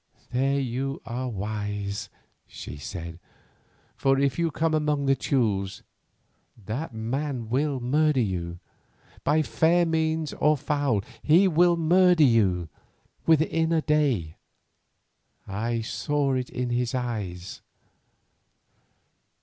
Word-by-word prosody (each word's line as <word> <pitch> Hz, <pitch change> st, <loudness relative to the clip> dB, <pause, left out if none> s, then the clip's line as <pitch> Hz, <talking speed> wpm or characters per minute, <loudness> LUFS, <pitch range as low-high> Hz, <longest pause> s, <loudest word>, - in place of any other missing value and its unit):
"There 135 Hz, +2 st, +1 dB
you 135 Hz, +2 st, -3 dB
are 125 Hz, +2 st, -3 dB
wise," 105 Hz, -1 st, -4 dB, 0.4 s
she -, -, -9 dB
said, 85 Hz, +2 st, -7 dB, 0.8 s
"for 135 Hz, 0 st, +2 dB
if 140 Hz, +2 st, +1 dB
you 170 Hz, -1 st, +2 dB
come 160 Hz, +1 st, 0 dB
among 150 Hz, -2 st, +1 dB
the 135 Hz, 0 st, +4 dB
Teules 100 Hz, -9 st, -1 dB, 0.7 s
that 115 Hz, -, -5 dB
man 120 Hz, +2 st, -3 dB
will 140 Hz, +2 st, 0 dB
murder 150 Hz, +3 st, +2 dB
you; 90 Hz, -6 st, -2 dB, 0.7 s
by 155 Hz, +1 st, +3 dB
fair 170 Hz, +3 st, +3 dB
means 160 Hz, -1 st, 0 dB
or 150 Hz, +1 st, +2 dB
foul 140 Hz, -7 st, 0 dB, 0.2 s
he 175 Hz, +6 st, +5 dB
will 175 Hz, 0 st, +4 dB
murder 175 Hz, 0 st, +4 dB
you 100 Hz, -, +3 dB, 0.6 s
within 160 Hz, +1 st, +3 dB
a 160 Hz, -2 st, +2 dB
day, 135 Hz, -, +1 dB, 1.1 s
I 115 Hz, +4 st, -2 dB
saw 135 Hz, +7 st, -1 dB
it 130 Hz, -1 st, -2 dB
in 125 Hz, -1 st, -3 dB
his 120 Hz, +1 st, 0 dB
eyes. 100 Hz, -8 st, -4 dB
130 Hz, 110 wpm, -26 LUFS, 110-155 Hz, 1.1 s, he